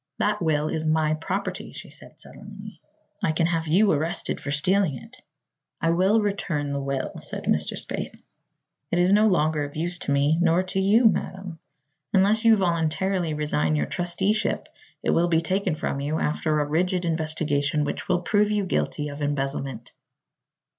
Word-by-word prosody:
"That 210 0 0
will 155 -2 +1
is 160 0 -2
my 155 -1 +2
property," 155 +1 -4
she - - -10
said - - -16
sullenly. - - -12 0.4
"I 155 - +1
can 165 +1 +1
have 165 -1 -1
you 195 +6 +4
arrested 160 +3 -1
for - - -6
stealing 150 +1 +2
it." - - -13 0.6
"I 165 - +1
will 190 +6 +3
return 170 -8 -2
the 140 - -2
will," 135 -1 -3
said - - -7
Mr. 75 0 +1
Spaythe. - - -4 0.7
"It 175 - 0
is 180 +2 +4
no 210 +1 +5
longer 155 -5 +1
of 145 0 -7
use 170 +2 -1
to - - -3
me 145 +3 +2
nor 175 +1 +3
to 185 +1 -3
you, 210 +5 +4
madam. 190 -5 0 0.5
Unless 210 +4 +3
you 225 -1 +7
voluntarily 170 -1 0
resign 80 - 0
your 75 -1 0
trusteeship 190 +5 -1 0.3
it - - +1
will 170 +1 +3
be 165 -2 +3
taken 185 +1 -1
from 140 - -3
you, 145 +3 -2
after 155 0 0
a 145 - +1
rigid 175 +4 0
investigation 155 -2 0
which 145 - -4
will 175 -1 +2
prove 210 0 +2
you 210 -2 0
guilty 150 -4 -1
of 145 +1 -8
embezzlement." 135 -4 -3
165 Hz, 170 wpm, -25 LUFS, 150-190 Hz, 0.7 s, you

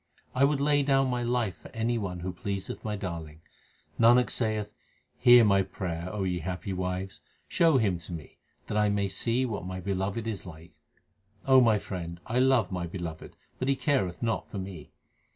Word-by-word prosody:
1 135 +2 +4
would 145 -1 0
lay 145 0 +3
down 135 -1 +3
my 125 -1 -1
life 120 -5 0
for - - -13
any 115 +1 0
one 95 -6 -3
who 90 +1 -4
pleased 100 0 -4
my 105 -1 -2
Darling. 85 -6 -6 0.6
Nanak 120 +2 +5
saith, 110 -3 -1 0.5
hear 120 -2 +8
my 100 -1 +4
prayer, 90 -2 -4
O 105 -1 -2
ye 90 -2 -1
happy 95 +3 -4
wives, 90 +1 -4 0.3
show 165 -4 +4
Him 100 -8 +1
to 85 - -10
me, 80 -4 -9 0.3
that - - -4
I 105 0 +3
may 100 -1 +1
see 115 +6 0
what 105 -6 -4
my 95 0 -5
Beloved 95 +4 -2
is 110 -5 -3
like. 80 0 -11 0.7
O 130 -1 +7
my 115 -3 +4
friend, 85 -4 -6
I 120 +3 0
love 130 -7 +3
my 90 -2 -3
Beloved, 85 -2 -7 0.2
but 130 - -1
He 140 - +3
careth 125 - 0
not 115 -1 -1
for - - -6
me. 95 -5 -7
100 Hz, 190 wpm, -28 LUFS, 90-120 Hz, 0.7 s, hear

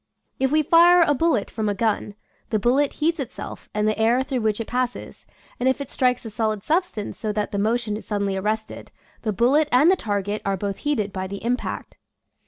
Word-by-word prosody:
If 265 0 +1
we 310 0 +3
fire 345 +3 +6
a 295 - +3
bullet 280 -8 +1
from 215 -2 -2
a 205 - -1
gun, 210 -1 -1 0.3
the 220 - +1
bullet 260 +6 +2
heats 325 +2 0
itself 265 - -7
and 210 0 0
the 215 +1 0
air 235 +4 +3
through 265 -3 -2
which 215 -1 0
it 230 - -3
passes, 245 +1 -4 0.3
and 255 +2 +2
if 260 - 0
it 280 - -6
strikes 250 -1 +1
a 225 - -6
solid 215 -2 -1
substance 320 - -1
so 215 - -2
that 210 0 -2
the 200 - -2
motion 220 0 0
is 215 - -8
suddenly 200 -2 -1
arrested, 215 +3 -3 0.3
the 220 - -1
bullet 265 +9 +3
and 285 +8 +6
the - - +4
target 205 - -2
are 195 -1 -1
both 200 0 -3
heated 215 -10 -1
by 190 0 -3
the 200 +3 -7
impact. 245 +1 -3
230 Hz, 210 wpm, -23 LUFS, 210-270 Hz, 0.3 s, fire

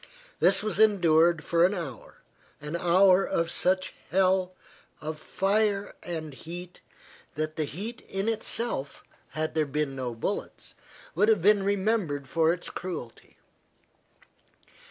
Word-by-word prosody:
This 195 +2 +4
was 215 -1 -1
endured 170 -6 +4
for 170 0 +2
an 190 +3 +3
hour, 145 - -7 0.4
an 150 +2 -5
hour 185 +2 +5
of 165 -2 -1
such 185 +1 +1 0.2
hell 185 0 +2 0.4
of 155 0 -6
fire 200 +2 0
and 160 -4 -5
heat, 175 +5 -9 0.5
that 155 +1 -3
the 155 - -1
heat 210 - -6
in 195 +2 -2
itself, 225 - -1 0.3
had 155 +1 -2
there 155 -2 +1
been 145 -1 -2
no 125 -3 -4
bullets, 115 - -5 0.4
would 205 +7 +3
have 210 -6 +3
been 205 0 +5
remembered 195 - 0
for 160 +3 +2
its 175 +1 -4
cruelty. 165 -11 -7
175 Hz, 130 wpm, -27 LUFS, 155-195 Hz, 0.5 s, hour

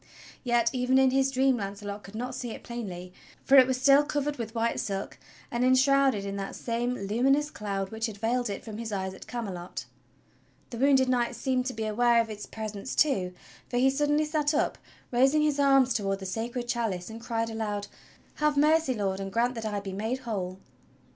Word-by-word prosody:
Yet 240 -2 +2
even 255 0 +2
in 265 -1 +5
his 270 0 +2
dream 265 -1 +2
Launcelot 200 0 -5
could 200 - -12
not 250 +3 -4
see 250 -1 -5
it - - -8
plainly, 185 -7 -6 0.3
for 275 - +5
it 255 -1 +8
was 260 -1 0
still 275 +2 +6
covered 290 0 -2
with 230 -1 -6
white 230 0 0
silk 195 -1 -4 0.3
and 240 +1 0
enshrouded 260 -3 +4
in 200 0 -4
that 195 0 -5
same 240 +1 -2
luminous 260 +9 +1
cloud 195 -2 -4
which 225 +1 -2
had 215 -2 -8
veiled 235 +2 0
it 200 - -5
from 220 -1 -7
his 230 -1 -5
eyes 190 -2 -3
at 190 - -12
Camelot. 195 -8 -5 0.9
The 235 - -6
wounded 265 -1 +4
Knight 245 -1 +1
seemed 255 -1 0
to 255 - -2
be 220 -1 -3
aware 235 +2 +3
of 225 -1 0
its 210 -1 -7
presence 215 +2 -6
too, 190 -12 +2 0.3
for 245 - -1
he 265 +2 +4
suddenly 295 +2 +1
sat 300 -1 0
up - - 0 0.3
raising 270 +5 +4
his 295 -2 +1
arms 270 -3 +5
toward 195 -2 -1
the 195 - -8
Sacred 235 +5 -3
Chalice 225 -6 -2
and 225 +1 -9
cried 230 -1 -2
aloud: 210 -2 -3 0.5
"Have 300 -1 +1
mercy. 305 -2 +3
Lord, 195 -3 -1
and 195 0 -5
grant 235 +4 +1
that 225 -2 -6
I 205 -1 -2
be 195 -1 -6
made 220 +6 -2
whole!" 190 -6 -4
235 Hz, 200 wpm, -28 LUFS, 205-265 Hz, 0.9 s, it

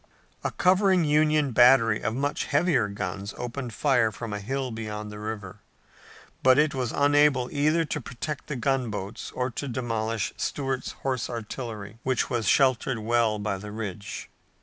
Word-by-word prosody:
A - - 0
covering 185 -1 +3
Union 150 -1 +3
battery 120 -2 +5
of 110 +2 -1
much 145 +2 -1
heavier 145 - +2
guns 100 0 -5
opened 125 0 -5
fire 125 -6 +3
from 110 0 -6
a 105 - -3
hill 130 +5 -3
beyond 105 -1 -5
the 105 - -8
river, 105 -3 -6 0.8
but 130 0 +6
it 150 0 +3
was 125 -3 -2
unable 145 -3 +3
either 155 +3 +2
to 150 -1 -3
protect 130 +4 -6
the 150 - -3
gunboats 115 -6 -2
or 125 0 -1
to 140 +5 -4
demolish 115 -3 -2
Stuart's 135 -2 -2
horse 130 -3 -1
artillery, 115 -2 -6
which 130 -1 0
was 115 -4 0
sheltered 130 -1 +3
well 110 0 +1
by 105 -2 -2
the 105 +1 -8
ridge. 105 -2 -6
125 Hz, 155 wpm, -26 LUFS, 110-140 Hz, 0.8 s, but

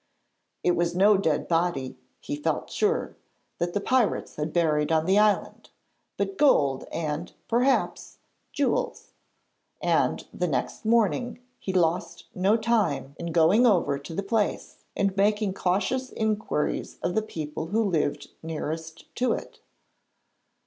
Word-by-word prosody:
It 180 - +4
was 170 0 0
no 200 +3 +6
dead 160 -6 0
body, 165 -6 0 0.2
he 290 - -4
felt 295 - -2
sure, 430 +2 0 0.4
that 175 +2 -2
the - - +2
pirates 245 +1 +1
had 150 +1 -3
buried 155 -3 +1
on 160 0 +2
the 190 +3 +4
island, 210 -1 +1 0.5
but 390 - -2
gold 140 - +3
and, 155 +1 -3 0.2
perhaps, 250 +4 +1 0.3
jewels; - - -1 0.7
and - - +1
the - - -1
next - - -3
morning 235 +2 +2 0.2
he 190 - -3
lost 175 -2 0
no 195 +4 +3
time 210 - 0
in 170 0 -4
going 175 +9 +5
over 170 -9 +2
to 160 +4 -9
the 200 - -2
place 210 +1 -1 0.2
and 200 -1 0
making 205 0 +2
cautious 205 +9 0
inquiries 215 -8 -1
of 175 - 0
the 220 - +2
people 155 -6 -5
who 220 +6 +1
lived 165 -8 -1
nearest 160 0 -5
to 250 +1 +2
it. - - -7
190 Hz, 135 wpm, -26 LUFS, 160-220 Hz, 0.7 s, no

